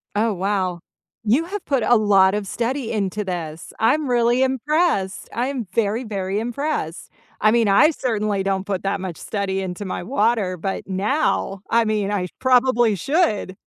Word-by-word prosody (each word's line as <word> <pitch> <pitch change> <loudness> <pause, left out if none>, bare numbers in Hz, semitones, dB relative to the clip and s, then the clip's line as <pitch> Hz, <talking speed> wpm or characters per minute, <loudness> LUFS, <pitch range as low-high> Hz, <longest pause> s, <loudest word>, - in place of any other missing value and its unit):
Oh, 220 +1 +2
wow. 185 -2 -1 0.4
You 255 +10 +2
have 400 +2 -5
put 270 -5 +1
a 240 - +4
lot 195 -3 +4
of 205 -1 -2
study 240 +3 -2
into 210 -1 -1
this. 165 -4 -6
I'm 275 +5 +2
really 240 +1 +3
impressed. 265 - 0
I'm 245 -3 -2
very, 230 +2 0
very 195 -2 -2
impressed. 240 - -3 0.3
I 215 - +5
mean, 230 -2 +3
I 275 +11 +5
certainly 215 -8 -1
don't 195 0 -1
put 195 -3 -3
that 200 +1 -1
much 180 -4 -5
study 195 -2 -3
into 190 +2 -5
my 185 - -4
water, 215 -5 0
but, 190 +4 -3
now, 195 0 0
I 230 0 +3
mean, 210 -2 0
I 200 -3 -1
sh 180 - -8
probably 250 -4 +3
should. 215 - 0
215 Hz, 165 wpm, -21 LUFS, 195-245 Hz, 0.4 s, I